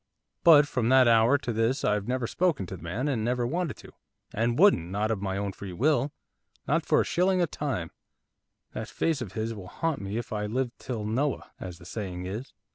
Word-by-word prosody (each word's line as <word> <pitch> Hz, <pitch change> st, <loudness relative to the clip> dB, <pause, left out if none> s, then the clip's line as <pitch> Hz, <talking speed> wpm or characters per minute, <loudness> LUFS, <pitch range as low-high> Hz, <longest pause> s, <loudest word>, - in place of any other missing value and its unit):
But 150 Hz, -4 st, +8 dB
from 125 Hz, -4 st, 0 dB
that 130 Hz, -1 st, +6 dB
hour 115 Hz, +4 st, +5 dB
to 125 Hz, -4 st, -4 dB
this 115 Hz, +5 st, +1 dB
I've 105 Hz, -1 st, +1 dB
never 125 Hz, -1 st, -1 dB
spoken 160 Hz, -, 0 dB
to 95 Hz, -, -7 dB
the -, -, -12 dB
man, 95 Hz, -, -3 dB
and 125 Hz, -7 st, 0 dB
never 120 Hz, +1 st, 0 dB
wanted 165 Hz, +3 st, -2 dB
to, -, -, -13 dB, 0.4 s
and 115 Hz, +2 st, 0 dB
wouldn't, 155 Hz, -, +5 dB
not 105 Hz, +3 st, -1 dB
of 105 Hz, -3 st, -2 dB
my 95 Hz, -1 st, -2 dB
own 100 Hz, 0 st, -2 dB
free 95 Hz, -1 st, -8 dB
will, 140 Hz, -, +2 dB, 0.6 s
not -, -, +2 dB
for -, -, +3 dB
a -, -, -1 dB
shilling 185 Hz, +1 st, +2 dB
a 175 Hz, -, +4 dB
time, 135 Hz, -, -3 dB, 0.8 s
that -, -, -5 dB
face 160 Hz, -4 st, 0 dB
of 100 Hz, -7 st, -6 dB
his 110 Hz, +2 st, -2 dB
will 100 Hz, -4 st, -9 dB
haunt 165 Hz, -, -2 dB
me 100 Hz, +2 st, -4 dB
if 120 Hz, -, -4 dB
I 105 Hz, -1 st, -2 dB
live 125 Hz, +3 st, -1 dB
till 120 Hz, -5 st, -4 dB
Noah, 130 Hz, +7 st, -1 dB
as 90 Hz, -2 st, -7 dB
the 85 Hz, -, -15 dB
saying 90 Hz, -3 st, -5 dB
is. 105 Hz, +8 st, -5 dB
115 Hz, 215 wpm, -28 LUFS, 100-140 Hz, 0.8 s, But